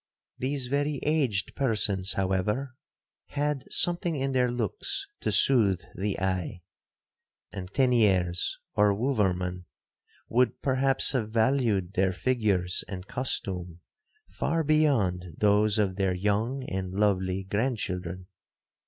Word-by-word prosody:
'These 135 0 -1
very 145 +2 -1
aged 135 -10 0
persons, 105 -7 +1
however, 95 +8 -1 0.5
had 145 -2 -2
something 175 -1 +3
in 135 -1 -1
their 125 -1 +2
looks 125 - -2
to - - -2
soothe 100 -9 +3
the 100 +1 -3
eye, 95 -1 -2 0.9
and 95 -1 -7
Teniers 100 -10 +2 0.2
or 105 -1 +3
Wouverman 95 -7 -1 0.6
would 125 +2 +1
perhaps 135 0 +4
have 115 -6 -1
valued 110 -5 +1
their 95 0 +1
figures 100 -5 0
and 95 -2 -7
costume 90 -8 -3 0.5
far 165 0 -1
beyond 110 - +1
those 105 +1 +3
of 100 -3 0
their 95 -2 0
young 105 +8 -1
and 95 -4 -4
lovely 95 -2 0
grandchildren. 95 -5 -3
105 Hz, 110 wpm, -27 LUFS, 95-130 Hz, 0.9 s, perhaps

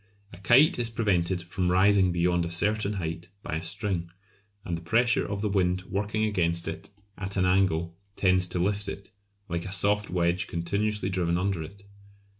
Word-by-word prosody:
A 90 - -11
kite 130 - +5
is 120 -1 +1
prevented 95 -6 0
from 90 +1 -2
rising 95 0 +4
beyond 90 0 +1
a 85 - -3
certain 105 +4 +1
height 85 -2 -5
by 80 - -3
a 80 - -6
string, 90 -1 -2 0.6
and 85 - -2
the 85 - -6
pressure 115 +8 +2
of 100 -1 -4
the 105 - 0
wind 90 -2 +1
working 105 +3 -1
against 85 -5 0
it - - -6 0.3
at 95 0 -2
an 95 - +2
angle 85 -3 +1 0.2
tends 95 -1 +3
to 90 - -4
lift 100 +3 -1
it, 100 0 -8 0.4
like 85 0 -3
a - - -6
soft 105 +2 +2
wedge 90 +1 0
continuously 100 +4 -1
driven 85 -2 0
under 95 -2 -1
it. 100 +6 -10
95 Hz, 180 wpm, -27 LUFS, 85-100 Hz, 0.6 s, kite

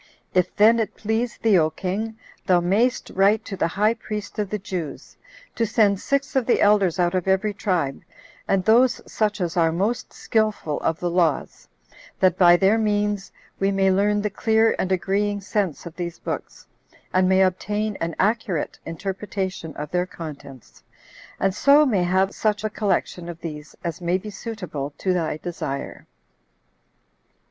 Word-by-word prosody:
If 180 -1 +1
then 225 +3 +5
it 220 - -2
please 220 +2 -1
thee, 210 -5 +4
O 155 -1 +3
king, 200 +7 -4 0.3
thou 180 -2 +5
mayst 205 +8 +1
write 200 +3 +3
to 195 - -5
the 170 - +1
high 210 +6 +2
priest 210 -1 -6
of 205 -2 -1
the 210 - -2
Jews, 180 -6 -6 0.4
to 230 - -1
send 205 -3 +3
six 280 +3 -1
of 260 -3 +1
the 245 - +3
elders 200 -4 +3
out 175 -1 +1
of 185 0 -1
every 190 +2 +2
tribe, 180 -9 -1 0.5
and 195 -1 +1
those 240 +3 +4
such 210 -1 -1
as 175 -3 -2
are 165 -2 +3
most 205 +9 -1
skillful 215 -9 -1
of 165 - -1
the 175 -1 -1
laws, 170 -5 0 0.5
that 185 -2 +4
by 175 -1 +6
their 200 +4 +3
means 205 -2 0 0.3
we 195 - +2
may 195 -1 +2
learn 205 +2 +2
the 210 - -1
clear 220 +2 +2
and 190 - -1
agreeing 200 +2 0
sense 195 -4 -2
of 170 -1 -9
these 170 -2 -5
books, - - -6 0.5
and 185 0 +3
may 190 0 +5
obtain 205 +3 -1
an 165 0 -2
accurate 200 -5 0
interpretation 190 -1 -4
of 150 0 -6
their 180 0 0
contents, 140 -7 -10 0.6
and 195 -1 +1
so 285 +8 +5
may 215 -9 +2
have 190 +2 +1
such 210 -1 0
a 215 - -1
collection 190 -4 -1
of 170 -1 -8
these 150 -2 -7
as 170 0 -4
may 175 +1 +1
be 210 +3 -8
suitable 180 - -6
to 185 - 0
thy 165 -4 -1
desire." 155 -5 -5
195 Hz, 170 wpm, -23 LUFS, 175-210 Hz, 0.6 s, by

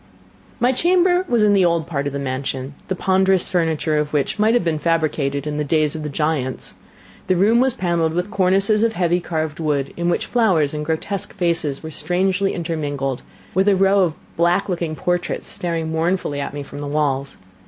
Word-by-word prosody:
My 245 +2 +3
chamber 360 +5 +3
was 235 -3 +3
in 205 -1 +4
the 195 -2 +4
old 170 -2 +2
part 145 -4 -2
of 140 - -4
the - - -2
mansion, 135 0 -4
the 190 - -1
ponderous 190 0 +2
furniture 160 -3 0
of 150 0 -3
which 145 +7 0
might 220 +2 +4
have 240 - +2
been 160 -3 -1
fabricated 150 -3 0
in 150 -1 -3
the 150 - 0
days 150 0 +2
of 155 - -4
the 150 - -4
giants. 145 -3 -2 0.5
The 185 - +3
room 210 +6 +4
was 260 -1 +2
panelled 170 -3 0
with 180 +4 -2
cornices 195 +1 +2
of 230 0 +2
heavy 175 -2 +1
carved 160 -3 -3
work, 145 -4 0
in 175 0 -1
which - - 0
flowers 185 -12 +2
and 150 0 -3
grotesque 175 +6 -3
faces 165 -5 0
were 160 - -6
strangely 190 +4 0
intermingled; 145 -6 -3 0.3
and 190 +2 +2
a 200 - +5
row 195 +1 +3
of 175 -5 +2 0.2
black 175 +3 +2
looking 170 -4 -2
portraits 175 +2 -2
stared 165 -2 -2
mournfully 160 -2 -1
at 140 - -5
me 145 - -4
from 140 +1 -9
the 145 - -5
walls. 140 -2 -1
165 Hz, 195 wpm, -20 LUFS, 150-190 Hz, 0.5 s, a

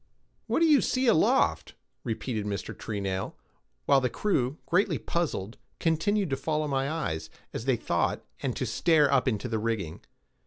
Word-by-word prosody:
"What - - +1
do - - +6
you 300 -3 +6
see 255 +1 0
aloft?" 225 -10 +3 0.3
repeated 110 -1 -3
Mr. 100 -2 -4
Treenail, 100 -3 -3 0.5
while 140 -1 +5
the 125 - +1
crew, 140 - 0
greatly 185 +4 +2
puzzled, 120 - -3 0.2
continued 175 +3 +1
to 135 - +1
follow 155 0 -1
my 135 -1 0
eyes, 135 - -3 0.2
as 115 - -4
they 130 -3 +2
thought, - - -1 0.2
and - - -2
to - - -2
stare 150 -5 +3
up 135 -1 +3
into 120 0 0
the 110 -2 -1
rigging. 105 -8 -2
135 Hz, 160 wpm, -28 LUFS, 110-165 Hz, 0.5 s, do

